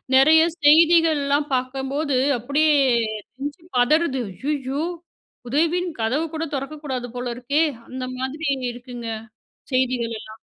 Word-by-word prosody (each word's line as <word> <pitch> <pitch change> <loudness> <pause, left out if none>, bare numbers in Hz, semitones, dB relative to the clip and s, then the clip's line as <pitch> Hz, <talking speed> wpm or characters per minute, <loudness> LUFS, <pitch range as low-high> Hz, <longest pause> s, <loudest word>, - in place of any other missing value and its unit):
நெறைய 310 +4 +7 0.2
செய்திகள்லாம் 305 -2 +5
பாக்கம்போது 265 +2 -1 0.2
அப்படியே 285 +6 +2 0.7
நெஞ்சு 290 +5 -5 0.2
பதறுது. 265 0 +2 0.3
ஐயயோ! 275 +1 -2 0.7
உதவின் 335 +6 +1
கதவு 255 +9 +1
கூட 320 +1 -2
தொறக்கக்கூடாது 275 -3 -4
போல 245 0 -4
இருக்கே 280 +6 +1 0.3
அந்த 255 0 -5
மாதிரி 285 +5 -4 0.3
இருக்குங்க. 245 -1 -8 0.6
செய்திகளெல்லாம். 230 -4 -1
275 Hz, 95 wpm, -22 LUFS, 255-310 Hz, 0.7 s, நெறைய